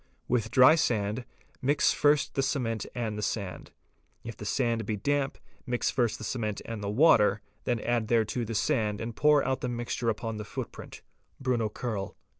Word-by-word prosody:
With 115 -3 0
dry 130 +5 +7
sand, 115 -6 0 0.4
mix 145 +2 +3
first 145 -1 +2
the 135 - +1
cement 120 -6 -1
and 110 -3 -2
the - - -3
sand: 100 -2 -3 0.5
if 115 -1 -7
the 105 - -9
sand 115 0 0
be 110 +1 -2
damp, 140 +5 -1 0.3
mix 120 0 0
first 120 -4 +1
the - - -9
cement 110 -3 -2
and 115 -3 -5
the 100 - -2
water, 105 -4 +4 0.2
then 120 -2 0
add 120 -2 0
thereto 115 +1 +1
the 115 0 -4
sand 105 -3 +1
and 115 0 -5
pour 150 -1 +4
out 130 0 -1
the 125 - -2
mixture 120 0 -2
upon 115 0 -3
the 105 - -5
footprint 105 - -8 0.4
(Bruno 125 -4 0
Kerl). 105 -4 -4
115 Hz, 180 wpm, -29 LUFS, 110-130 Hz, 0.5 s, dry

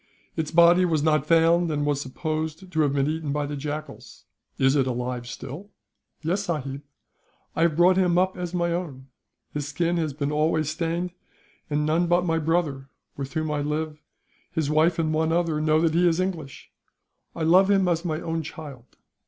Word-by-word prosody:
Its 155 -2 -2
body 170 +2 +6
was 160 -4 +1
not 155 -2 +2
found, 165 +1 +4
and 145 -1 -1
was 145 -1 0
supposed 155 +5 -4
to 160 -2 +1
have 145 -2 +2
been 140 0 +1
eaten 155 -1 -2
by 145 0 -1
the 145 0 -4
jackals. 150 0 -7 0.3
Is 135 +1 +3
it 135 -2 +2
alive 125 -1 -3
still?" 140 +10 -8 0.5
"Yes, 190 +5 0
sahib, 140 -6 -3 0.7
I - - -1
have 165 -2 +3
brought 180 +3 +5
him 180 -2 +3
up 185 +1 +2
as 180 -1 -4
my 170 -1 0
own. 145 -7 -5 0.4
His 145 -1 -3
skin 170 +4 0
has 155 -4 -1
been 145 0 -2
always 155 0 +1
stained; 170 +3 -2 0.6
and 150 0 0
none 165 +3 +2
but 175 +1 +2
my 165 -1 +1
brother 155 -4 -1 0.3
with 135 -1 -6
whom 155 -1 -1
I 150 -1 -1
live 150 +1 -3 0.5
his 155 -2 -1
wife, 160 +2 +3
and 160 -2 0
one 160 +1 +1
other, 165 -2 +1
know 155 0 +3
that 165 -1 +2
he 175 +2 +4
is 165 0 +2
English. 170 -7 -4 0.6
I 165 - -3
love 185 +4 +5
him 195 -2 +3
as 170 -1 +1
my 155 -3 -2
own 165 0 -2
child. 145 -5 -10
160 Hz, 190 wpm, -25 LUFS, 145-170 Hz, 0.7 s, body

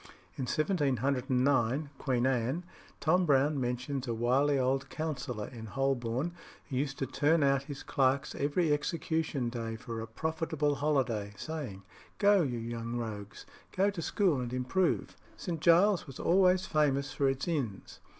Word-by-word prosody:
In 130 - -3
1709 135 - +1
(Queen 125 -3 +1
Anne) 130 +6 0 0.4
Tom 180 +3 +3
Browne 140 0 +3
mentions 125 +2 -2
a 115 - -1
wily 135 +5 +2
old 135 +1 0
counsellor 135 -9 -3
in 115 -3 -9
Holborn 135 +3 -1 0.4
who 130 - -3
used 140 +1 -1
to 135 - -1
turn 150 +4 +2
out 140 0 +2
his 140 -1 -6
clerks 135 +2 +1
every 150 +3 +1
execution 150 -3 -1
day 115 -2 -4
for 115 0 -6
a 115 - -6
profitable 160 +3 -1
holiday, 130 -8 0
saying, 130 -10 -5 0.3
"Go, 205 -1 +5
you 130 -7 -1
young 115 0 -4
rogues, 110 -3 -6 0.3
go 200 +2 +4
to 185 -4 -5
school 175 -4 +1
and 120 -1 -4
improve." 130 +9 0 0.2
St. 165 -4 -4
Giles's 175 +4 +4
was 135 - -9
always 185 +1 +4
famous 145 -2 +1
for 140 -1 +2
its 135 +3 -2
inns. 135 - -3
135 Hz, 150 wpm, -31 LUFS, 125-155 Hz, 0.4 s, Go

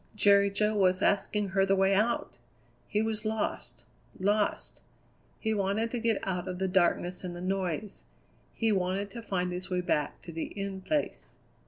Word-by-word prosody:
Jerry 200 -1 +5
Jo 210 +2 +1
was 185 -2 +3
asking 205 0 +1
her 195 +1 +2
the 195 0 +3
way 195 0 +3
out! 215 +4 0 0.5
He 210 0 +1
was 220 -1 -1
lost 215 -1 -3 0.4
lost. 205 +2 0 0.6
He 220 -1 0
wanted 205 +3 0
to 245 - -2
get 225 -2 0
out 180 -2 -2
of 180 -1 -4
the 190 +1 0
darkness 180 -1 +1
and 175 -1 -5
the - - -7
noise; 190 +1 -3 0.5
he 225 -1 +1
wanted 195 +1 0
to 235 - -7
find 180 -5 -1
his 180 +2 -5
way 180 -1 0
back 150 -5 -1
to 170 - -8
the 165 0 -3
In 195 -1 -4
Place. 295 +10 -2
195 Hz, 175 wpm, -30 LUFS, 185-210 Hz, 0.6 s, Jerry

